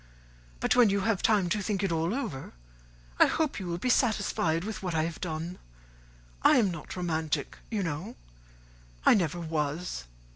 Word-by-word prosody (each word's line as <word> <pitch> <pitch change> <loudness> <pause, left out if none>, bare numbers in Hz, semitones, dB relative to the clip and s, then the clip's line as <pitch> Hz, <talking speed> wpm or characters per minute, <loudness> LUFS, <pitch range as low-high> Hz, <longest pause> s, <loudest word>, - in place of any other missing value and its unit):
But - - +2
when 245 -4 +6
you 200 0 +1
have 220 -1 +1
had - - -9
time 205 -5 +3
to 210 +3 0
think 200 -1 -1
it 195 - +1
all 165 +2 0
over, 220 - -4 0.7
I - - +8
hope 310 -6 0
you 185 - -5
will 170 0 -2
be 250 +7 +1
satisfied 200 -9 +1
with 215 +2 -5
what 180 -3 -2
I 155 - +2
have 165 0 -4
done. 165 +1 -4 0.8
I - - +6
am 210 -6 +3
not 165 -3 -7
romantic, 160 -4 -2
you 215 -4 -1
know. 175 +7 -4 0.9
I - - +8
never 175 -4 +1
was. 155 - -2
180 Hz, 180 wpm, -29 LUFS, 160-210 Hz, 0.9 s, I